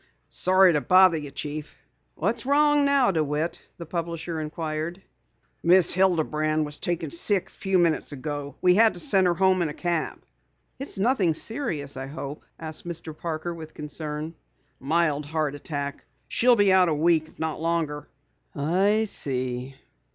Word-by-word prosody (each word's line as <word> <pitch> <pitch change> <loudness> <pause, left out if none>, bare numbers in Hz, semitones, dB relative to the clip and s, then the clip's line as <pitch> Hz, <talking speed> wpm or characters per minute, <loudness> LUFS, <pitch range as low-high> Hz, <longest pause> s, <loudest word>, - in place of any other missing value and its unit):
"Sorry 185 -1 +4
to 150 - +1
bother 185 -1 +5
you, 150 -2 -6
Chief." 145 +1 -6 0.4
"What's 225 +8 -2
wrong 295 0 +4
now, 280 -5 +4
DeWitt?" 155 0 -1 0.2
the 170 - -7
publisher 165 0 -4
inquired. 155 +2 -4 0.6
"Miss 175 0 +4
Hilderman 155 -4 +1
was 150 0 -4
taken 165 -4 -2
sick 190 +1 0
a - - -23
few 190 -1 0
minutes 170 -4 +1
ago. 145 0 -5
We 180 -1 +6
had 220 +3 +5
to - - -6
send 195 -11 +3
her 175 - +2
home 190 +1 +3
in 165 - 0
a 150 - -7
cab." 170 -3 -2 0.6
"It's 275 -5 -6
nothing 195 - +2
serious 155 - -2
I 135 0 -5
hope," 145 +1 -7 0.2
said 160 -1 -5
Mr. 160 -2 -6
Parker 165 +1 -4
with 160 -2 -10
concern. 150 +1 -5 0.5
"A - - -18
mild 150 -1 +1
heart 155 -2 -1
attack. 145 -1 -5 0.2
She'll 245 0 +4
be 205 -3 +4
out 185 -2 +5
a 155 - +1
week, 160 0 +2
if - - -21
not 160 -1 -3
longer." 160 -3 -1 0.5
"I 190 +9 +2
see. 130 - -3
165 Hz, 160 wpm, -25 LUFS, 150-185 Hz, 0.6 s, We